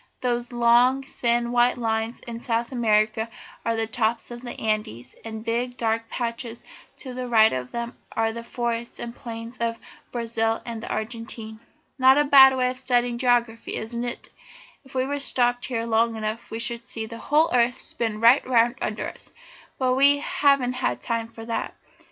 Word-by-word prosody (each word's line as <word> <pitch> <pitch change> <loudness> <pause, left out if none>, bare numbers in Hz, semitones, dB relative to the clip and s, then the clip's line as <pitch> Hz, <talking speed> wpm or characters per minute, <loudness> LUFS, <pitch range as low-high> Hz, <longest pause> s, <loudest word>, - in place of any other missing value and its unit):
"Those 240 -1 -1
long 240 +3 +4
thin 235 -2 0
white 245 +1 +3
lines 225 0 -2
in 230 -1 -7
South 235 0 -1
America 220 -1 +2 0.3
are 230 - 0
the 225 0 0
tops 225 +1 -1
of 240 0 -7
the 245 -1 -7
Andes, 210 - -2
and 220 -1 -6
the - - -12
big, 240 +2 -2
dark 225 0 -1
patches 235 -1 -4 0.3
to 260 -3 -7
the 250 0 -4
right 220 -2 +5
of 125 -1 -3
them 235 0 -4 0.2
are 225 0 0
the 230 0 -6
forests 235 0 -3
and 235 0 -6
plains 230 0 -8
of 230 0 -1 0.3
Brazil 225 -1 -1
and 230 -2 -5
the - - -7
Argentine. 220 0 -5 0.4
Not 260 +1 +6
a 295 - +5
bad 265 -2 +8
way 250 0 +2
of 255 - -8
studying 245 -2 +1
geography, 240 -2 +1
is 220 +2 -5
it? 240 0 -4 0.5
If 265 -1 -17
we 270 +3 0
stopped 245 -3 +2
here 230 -3 -2
long 230 0 +2
enough 220 +1 -4
we 225 - -4
should 235 0 -3
see 225 -2 -3
the 230 +1 -9
whole 305 0 +2
earth 245 0 +3
spin 220 -2 -3
right 235 +4 +6
round 240 0 +3
under 215 - -2
us, - - -10 0.5
but 255 -1 +2
we 280 +2 +5
haven't 280 -3 +2 0.3
time 230 -1 -1
for 225 0 -11
that. 230 0 -3
235 Hz, 180 wpm, -24 LUFS, 225-245 Hz, 0.5 s, bad